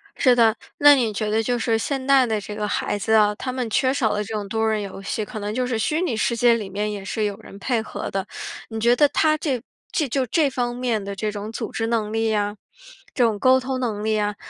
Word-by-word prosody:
是 255 -2 +4
的， 225 -2 +4 0.2
那 290 0 +8
你 235 -5 0
觉 210 +1 -2
得 220 +1 +2
就 245 +2 0
是 225 -1 +1
现 265 +3 -2
代 270 -1 +5
的 220 -3 -1
这 210 +1 -7
个 210 0 -2
孩 205 - -1
子 215 +2 -1
啊， 210 -1 +5
他 255 +4 -4
们 250 -3 -3
缺 260 +4 +2
少 240 -6 +1
了 210 - -1
这 215 +2 -7
种 210 -2 -3
多 220 +2 0
人 215 -1 0
游 195 -1 -7
戏， 215 +2 -3
可 215 0 -7
能 205 +1 -3
就 255 +2 0
是 245 -3 -1
虚 305 +9 0
拟 275 -11 0
世 235 +2 0
界 235 0 +4
里 210 -4 -4
面 205 +2 -2
也 205 -2 -6
是 215 +3 -2
有 205 -1 -2
人 210 -2 -13
配 235 +2 0
合 220 - -6
的。 195 -1 -2 0.4
你 225 -1 -4
觉 235 +2 +4
得 295 +3 +5
他 310 +1 +2
这 270 -6 -2 0.3
这 305 - 0
就 260 +1 0
这 295 +4 +2
方 245 -2 -2
面 240 -4 -1
的 200 0 -5
这 210 +2 -2
种 210 +1 -6
组 - - -5
织 225 - -2
能 225 -2 -1
力 225 0 0
呀， 205 -1 0 0.6
这 250 - +2
种 225 -3 +2
沟 260 +2 +5
通 260 0 -3
能 220 -5 -2
力 220 0 +1
呀， 210 -1 0
225 Hz, 285 characters per minute, -23 LUFS, 210-255 Hz, 0.6 s, 那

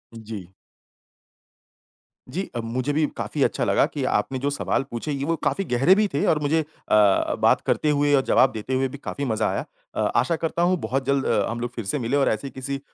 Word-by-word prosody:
जी। 110 -5 -8 1.8
जी 190 - -4
अ, - - -1
मुझे 125 +5 -2
भी 155 +1 +2
काफ़ी - - -1
अच्छा - - 0
लगा - - +3
कि - - -3 0.2
आपने 130 +5 -4
जो 140 +2 0
सवाल 140 -1 -1
पूछे 120 +6 -4
ये 140 -1 -2
वो 165 +2 +1
काफ़ी 195 - 0
गहरे 135 +10 +5
भी 210 +1 +3
थे 140 - +1
और - - -2
मुझे 150 +2 +1
अ, - - -7 0.7
बात - - +4
करते 155 - +1
हुए 145 0 +2
और 135 - +4
जवाब 130 0 +5
देते 110 +3 -5
हुए 130 +1 +2
भी 130 - -9
काफ़ी 140 0 -5
मज़ा 110 -3 0
आया। - - -2 0.3
अ, - - -3 0.2
आशा 170 - +2
करता 165 +1 -2
हूँ 180 +1 +3
बहुत 135 0 -1
जल्द 140 0 +1
अ, 100 - +2
हम 115 +1 -4
लोग 120 0 -3
फिर 115 - -5
से 105 +9 -1
मिले 125 +3 0
और 140 - +3
ऐसे 110 +6 -2
किसी 135 +1 -4
अ, - - -13
135 Hz, 225 wpm, -24 LUFS, 120-150 Hz, 1.8 s, गहरे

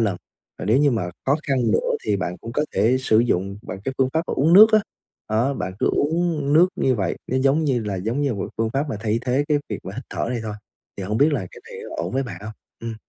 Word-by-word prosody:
lần. 100 -5 +1 0.4
Và - - -5
nếu 110 +6 +3
như 145 0 +4
mà 90 -8 -1 0.2
khó 140 +3 +4
khăn 135 - +2 0.2
nữa - - +1
thì 105 -2 +1
bạn 90 -1 -3
cũng 115 - -7
có 150 - +1
thể 115 +6 +3
sử 110 -4 +3
dụng 100 -3 0
bằng 95 - -7
cái 135 - -2
phương 130 -1 +3
pháp 160 - +2
bạn - - -2
uống 155 +5 +3
nước 215 +4 +9
á, 215 - +7 0.5
đó, 120 +6 +1
bạn 95 - -4
cứ - - +1
uống 155 -2 0
nước 175 +3 +6
như 130 - +2
vậy, 95 -6 -1
nó 130 - -1
giống 135 +4 +2
như 130 -5 +1
là 100 -2 -2
giống 115 +9 -2
như 140 -5 0
một 100 - -5
cái - - -8
phương 115 0 +1
pháp 140 +4 -1
mà 110 - -3
thay 110 0 0
thế 130 +3 +1
cái 150 -1 +3
việc 105 - -3
mà 95 - -6
hít 130 - -6
thở - - -2
này 120 - -2
thôi, 105 -1 -4 0.4
thì 100 - -5
hổng 105 +4 -1
biết 150 +2 +4
là 100 -10 -1
cái - - -13
này - - -8
có - - -6
ổn 90 - -4
với 135 - +1
bạn 95 -9 -7
hông? 110 - -6 0.3
Ừm. 115 -1 -5
120 Hz, 285 wpm, -22 LUFS, 105-140 Hz, 0.5 s, nước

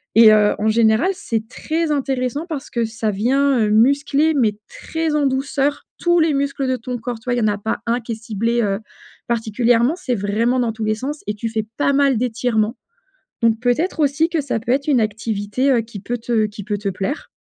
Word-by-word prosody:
et 220 -1 +8
heu, 210 -1 +4
en 215 - 0
général 220 - +3
c'est 230 - -3
très 320 +6 -2
intéressant 270 +1 -1
parce 295 -5 -5
que 235 - -1
ça 225 -1 -2
vient, 265 +7 +2
heu, 215 - +2
muscler, 280 +7 +3
mais 225 -8 +1
très 320 -1 -3
en 295 -1 +2
douceur, 270 +2 -1
tous 345 0 +2
les 320 -2 +3
muscles 275 -1 -1
de 260 - +1
ton 250 +1 -5
corps, 235 0 -5
tu - - -22
vois? 245 -1 0
Il - - 0
y - - 0
en 215 - +2
a 205 0 0
pas 220 +2 -3
un 235 +1 0
qui 230 - -7
est - - -1
ciblé, 230 +2 -1
heu, 200 -2 0 0.5
particulièrement. 235 +4 +2
C'est 290 -9 -2
vraiment 225 +5 0
dans 235 -2 0
tous 220 0 -5
les 215 0 +1
sens 280 +7 -5
et 210 - -3
tu 220 +2 -4
fais 220 -1 -2
pas 280 -1 +2
mal 275 -2 +3
d'étirements. 230 -1 0 0.7
Donc, 225 -1 +3
peut-être 255 +9 0
aussi 295 +3 +2
que 330 -2 0
ça 275 -5 -2
peut 235 +3 -1
être 280 +3 0
une 280 -4 +4
activité, 215 +3 -1
heu, 250 -3 +4
qui 225 -3 -9
peut 240 +5 -3
te 225 -1 +1
qui 205 -1 -9
peut 205 0 -2
te 200 0 -3
plaire. 195 - -3
240 Hz, 225 wpm, -20 LUFS, 220-280 Hz, 0.7 s, et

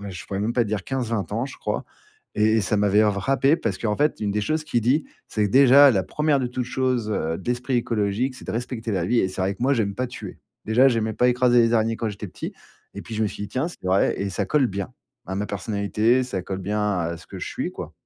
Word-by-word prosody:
à 100 - -6
je 90 -2 -8
pourrais 95 0 -3
même 110 +3 0
pas 120 -1 +2
dire, 105 -3 -3
15-20 115 -6 -2
ans, 115 +5 -1
je - - -10
crois - - -3 0.5
et 110 +1 +3
et - - +3
ça 105 +1 0
m'avait 105 +1 +4
frappé, 135 - +2
parce 105 - -2
qu'en 105 -2 -1
fait, 150 +1 +1
une 105 -1 -1
des 105 +1 -1
choses 155 +7 0
qu'il 120 -6 -1
dit, 135 +7 +2 0.2
c'est 105 - -1
que, - - -5
déjà, 140 +3 +8
la 95 -5 +1
1ère 150 +4 +1
de 130 - -1
toute 125 +1 -3
chose, 125 -4 -1
heu, 80 -5 -1
d'esprit 125 +4 -1
écologique, 115 +2 0
c'est - - -12
de - - -3
respecter 115 -1 -4
la 90 -3 0
vie 120 +2 +3
et 95 - +1
c'est 95 - -6
vrai 95 +1 0
que, 110 - -8
moi, 135 - +3
j'aime 105 -6 0
pas 130 +4 -2
tuer. 125 - -9 0.3
Déjà, 120 +5 +5
j'aimais 110 -3 0
pas 125 - +3
écraser 125 -1 +4
les 115 - +2
araignées, 115 0 +2
quand 115 -2 -2
j'étais 105 +1 -7
petit - - -7 0.4
et - - -7
puis 115 - -8
je 110 - 0
me - - +2
suis 105 - -6
dit: - - -7
«Tiens, 135 +7 -1
c'est - - -13
vrai 95 +1 +2
et 100 - -1
ça 95 - -2
colle 150 -4 +2
bien, 100 -3 -5 0.3
à 95 - -5
ma 105 +2 -2
personnalité, 105 +4 +1
ça 100 -7 -4
colle 95 +1 -5
bien 105 0 -1
à 85 0 -2
ce 80 - -15
que - - -9
je - - -5
suis - - -3
quoi». - - -7
110 Hz, 270 wpm, -24 LUFS, 100-125 Hz, 0.5 s, déjà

